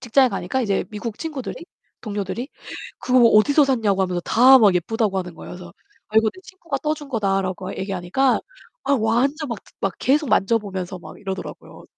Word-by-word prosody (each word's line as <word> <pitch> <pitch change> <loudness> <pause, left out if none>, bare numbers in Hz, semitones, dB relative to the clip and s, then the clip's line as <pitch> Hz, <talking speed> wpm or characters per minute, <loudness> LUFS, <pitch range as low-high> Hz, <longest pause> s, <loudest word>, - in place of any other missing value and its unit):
직장에 255 +2 +3
가니까 240 +5 -2
이제 200 -4 0
미국 215 +1 -6
친구들이 305 -6 -5 0.5
동료들이 210 +4 -4 0.5
그거 255 0 +3
어디서 285 +8 +5
샀냐고 215 -8 +1
하면서 180 -1 -1
다 260 +8 +6
막 205 -5 +5
예쁘다고 205 +3 0
하는 180 -2 -5
거예요. - - -10
그래서 175 -1 -10 0.4
"아 215 - -4
이거 220 0 +3
내 370 - -14
친구가 345 -7 -6
떠준 300 -2 -2
거다."라고 195 -4 -1
얘기하니까 190 +7 0 0.4
아 280 - +1
완전 265 +7 0
막 235 -4 -4 0.2
막 195 -3 -1
계속 290 +1 +1
만져보면서 195 -3 0
막 - - -12
이러더라고요. 190 -1 -7
220 Hz, 400 characters per minute, -22 LUFS, 190-265 Hz, 0.5 s, 다